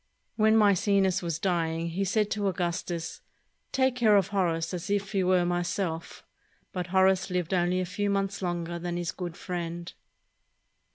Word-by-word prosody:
When 220 0 +4
Maecenas 200 -2 +3
was 170 -3 -2
dying, 165 -2 -1
he 180 +4 -1
said 210 +2 +1
to 205 -1 0
Augustus, 175 -2 -3 0.5
"Take 260 -1 +2
care 220 -4 +5
of 195 0 +1
Horace 170 -4 0
as 180 +1 -4
if 200 0 0
he 195 -3 +1
were 180 -1 +3
myself"; 175 -1 -2 0.5
but 180 -1 -3
Horace 190 +1 +3
lived 180 0 -1
only 180 0 +2
a 185 - 0
few 205 +3 -2
months 195 0 -1
longer 175 -1 -2
than 175 0 -3
his 175 -1 -2
good 175 -2 -6
friend. 175 -1 -5
180 Hz, 160 wpm, -28 LUFS, 175-200 Hz, 0.5 s, care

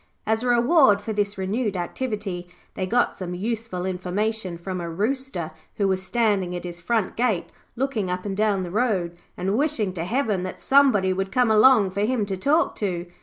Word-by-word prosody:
As 220 +1 +1
a 250 - -2
reward 245 -2 +5
for 220 - -4
this 205 -1 -1
renewed 200 +2 -1
activity, 195 -2 -4 0.3
they 185 - -3
got 240 +4 +1
some 180 -1 -5
useful 215 -2 -3
information 185 +1 -2
from 185 +1 -5
a 170 - -4
Rooster 205 - -2 0.2
who 200 - +1
was 190 -1 0
standing 195 -4 0
at 175 - -5
his 175 -1 -6
front 215 +2 -1
gate 225 -7 0 0.2
looking 240 -7 -1
up 180 +1 -3
and 195 -1 -3
down 205 -2 +1
the 175 - -6
road, 195 -6 0 0.2
and 190 +3 -1
wishing 245 -8 +1
to 165 -3 -3
heaven 215 -1 0
that 185 0 -6
somebody 255 -9 +4
would 195 +1 -3
come 250 -3 +3
along 215 -3 +6
for 200 +2 -2
him 220 0 +1
to 195 -1 -3
talk 290 - +2
to. 180 -4 -2
205 Hz, 190 wpm, -24 LUFS, 185-235 Hz, 0.3 s, along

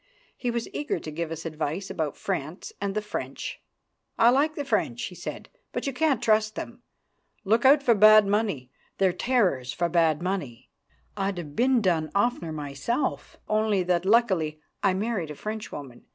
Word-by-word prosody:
He 245 - -3
was 235 -1 -2
eager 290 - -2
to 155 - -7
give 165 +1 -3
us 165 +1 -6
advice 160 +4 -3
about 155 -4 -3
France 175 -2 -4
and 200 0 -2
the 215 - -1
French. 210 0 -5 0.6
"I 235 +1 +6
like 295 +4 +2
the 290 - -3
French," 275 - 0
he - - -5
said, - - -7 0.2
"but - - -3
you 275 - -1
can't 275 -3 +1
trust 215 -1 +2
them. - - -7 0.6
Look 225 +5 +2
out 280 +1 +7
for 240 - +5
bad 215 0 +7
money. 200 - -1 0.3
They're 190 -2 +3
terrors 180 - +1
for 175 0 0
bad 165 -3 +3
money. 175 -10 -4 0.4
I'd 195 -2 -1
have 150 -4 -7
been 250 0 +3
done 165 -4 +1
oftener 200 -6 +1
myself, 150 - -3
only 215 -3 +2
that 175 -1 +1
luckily 190 -8 +2 0.2
I 195 -2 +2
married 200 -5 -2
a 150 - -6
Frenchwoman. 150 - -7
195 Hz, 170 wpm, -26 LUFS, 160-230 Hz, 0.6 s, out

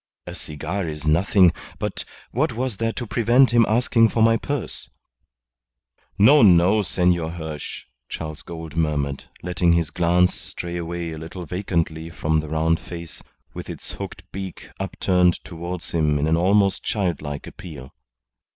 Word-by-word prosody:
A - - -7
cigar 85 +5 -4
is 75 0 -6
nothing, 85 +3 +4 0.2
but - - -3 0.3
what 135 +2 0
was 125 -2 -2
there 115 +1 0
to 120 - -5
prevent 120 +4 +4
him 115 -2 +5
asking 115 +1 +4
me - - +4
for 115 - +2
my 115 0 +5
purse?" 140 +3 -4 1.3
"No, 135 +9 +7
no, 95 +1 +6
Senor 90 -4 +1
Hirsch," 80 -3 -6 0.3
Charles 80 -2 -5
Gould 80 -2 -8
murmured, 75 -4 -1 0.2
letting 90 -1 +2
his 85 -2 +1
glance 90 +1 +3
stray 85 0 -5
away 85 0 -4
a 80 - -6
little 85 +3 -7
vacantly 85 -2 -2
from 80 -2 0
the 80 -1 -5
round 80 +1 +1
face, 85 -2 -8 0.3
with - - -7
its - - -7
hooked - - -7
beak 95 -2 -7
upturned 90 -1 +2
towards 85 0 -6
him 75 -3 +2
in 70 - 0
an 80 +1 +3
almost 100 +3 +3
childlike 80 -8 -2
appeal. 75 -9 -10
85 Hz, 150 wpm, -23 LUFS, 80-100 Hz, 1.3 s, No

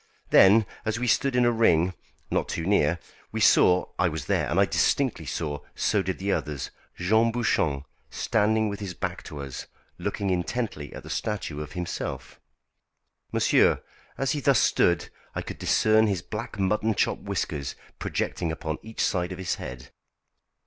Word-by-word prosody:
Then, 105 +3 +7 0.2
as 110 0 -1
we 125 - -1
stood 125 +3 +2
in 125 -1 +4
a 120 - +4
ring, 95 -6 +3 0.4
not - - 0
too 80 - -3
near, 85 -4 +3 0.3
we - - -3
saw 90 0 +5
I 90 -1 +3
was 80 -3 -5
there - - 0
and - - +1
I - - +6
distinctly - - +1
saw, 75 -2 -3 0.2
so 105 - +1
did 95 0 -3
the 100 +1 -1
others 75 -7 -2 0.3
Jean 110 +6 +3
Bouchon 80 - 0 0.2
standing 110 0 +1
with 100 -1 -4
his 95 -4 -5
back - - -3
to 75 - -7
us, 70 -3 -7 0.3
looking 100 -2 -2
intently 90 -4 -2
at - - -8
the - - -8
statue 95 -8 -3
of 75 - -7
himself. 90 -1 -5 0.9
Monsieur, - - +3 0.3
as 135 -1 0
he 150 - -1
thus 140 -2 +4
stood 85 -4 +2 0.3
I - - -2
could - - -8
discern 110 0 +4
his 95 -4 -1
black 105 +2 -6
mutton 105 +3 +1
chop - - +1
whiskers 70 -2 -3 0.2
projecting 85 - -2
upon 80 0 -4
each 110 0 -6
side 90 -1 0
of 90 - -5
his 95 -2 -2
head. 65 +2 -8
95 Hz, 170 wpm, -26 LUFS, 80-110 Hz, 0.9 s, Then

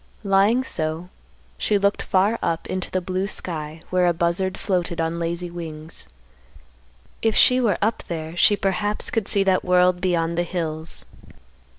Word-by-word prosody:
Lying 200 +5 +3
so, 160 -5 -3 0.5
she 210 - +2
looked 200 0 +1
far 200 +4 +2
up 165 0 -1
into 185 -1 -4
the 185 - -1
blue 185 +2 -2
sky 160 -5 -5
where 180 -1 +3
a 175 - +3
buzzard 170 +3 0
floated 175 -3 -1
on 165 +1 -1
lazy 170 +1 -3
wings. 160 - -7 1.1
If 225 -1 +1
she 255 0 +6
were 210 -7 +2
up 220 +2 0
there 160 -1 -5
she 205 +4 +5
perhaps 205 +2 -1
could 220 -3 -1
see 200 - +3
that 190 -1 +2
world 180 0 +3
beyond 170 -2 0
the - - +2
hills. 165 -2 -4
180 Hz, 160 wpm, -23 LUFS, 165-195 Hz, 1.1 s, she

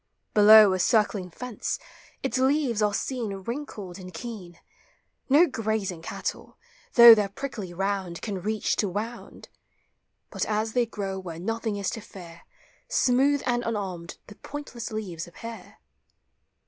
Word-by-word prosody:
Below, 210 -1 +8
a 185 - -1
circling 205 -2 +2
fence, 245 +6 -4 0.5
its 260 -1 0
leaves 265 -4 +2
are 210 -1 +3
seen 230 -2 -3
Wrinkled 205 -3 -6
and 185 -1 -9
keen; 180 -2 -8 0.7
No 295 +6 +7
grazing 220 - -2
cattle, - - -5 0.3
through 235 -1 +11
their 210 -2 +1
prickly 215 -4 -6
round, 190 -1 -2
Can 200 -4 -4
reach 215 +3 -1
to 205 - +1
wound; 220 +5 -6 0.8
But - - -2
as 220 +1 -1
they 245 -2 +2
grow 195 -3 -4
where 175 -3 -7
nothing 225 +2 -2
is 200 -2 -2
to 225 - -6
fear, 175 -5 -13 0.4
Smooth 270 +3 +2
and 240 -1 +1
unarmed 190 -7 -4
the - - -12
pointless 250 -2 -7
leaves 185 -7 -5
appear. 230 +6 -10
215 Hz, 135 wpm, -26 LUFS, 190-235 Hz, 0.8 s, through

